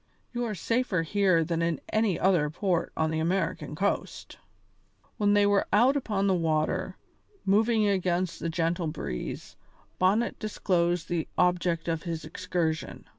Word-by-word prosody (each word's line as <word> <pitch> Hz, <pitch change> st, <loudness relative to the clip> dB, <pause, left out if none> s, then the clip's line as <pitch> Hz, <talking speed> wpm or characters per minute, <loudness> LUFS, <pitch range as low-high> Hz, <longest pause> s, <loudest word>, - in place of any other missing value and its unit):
You 240 Hz, 0 st, -1 dB
are 215 Hz, -3 st, -3 dB
safer 225 Hz, -2 st, 0 dB
here 185 Hz, -1 st, +2 dB
than 165 Hz, +1 st, -1 dB
in 170 Hz, -1 st, 0 dB
any 215 Hz, -5 st, +1 dB
other 175 Hz, -6 st, +3 dB
port 175 Hz, +2 st, -1 dB
on 160 Hz, 0 st, +1 dB
the 160 Hz, -, -1 dB
American 160 Hz, -3 st, -1 dB
coast." 200 Hz, +5 st, -3 dB, 0.8 s
When 205 Hz, -1 st, +3 dB
they 205 Hz, 0 st, +5 dB
were 205 Hz, -1 st, +2 dB
out 245 Hz, +6 st, +4 dB
upon 210 Hz, -8 st, 0 dB
the 195 Hz, -, +3 dB
water, 160 Hz, -3 st, 0 dB, 0.5 s
moving 215 Hz, +2 st, +3 dB
against 185 Hz, -2 st, 0 dB
the 165 Hz, -, -2 dB
gentle 165 Hz, +1 st, -1 dB
breeze, 150 Hz, -, -5 dB, 0.4 s
Bonnet 200 Hz, +6 st, +2 dB
disclosed 175 Hz, -5 st, 0 dB
the 170 Hz, -2 st, -2 dB
object 175 Hz, -2 st, +1 dB
of 165 Hz, -1 st, -1 dB
his 165 Hz, -3 st, -5 dB
excursion. 160 Hz, 0 st, -3 dB
180 Hz, 145 wpm, -28 LUFS, 165-205 Hz, 0.8 s, they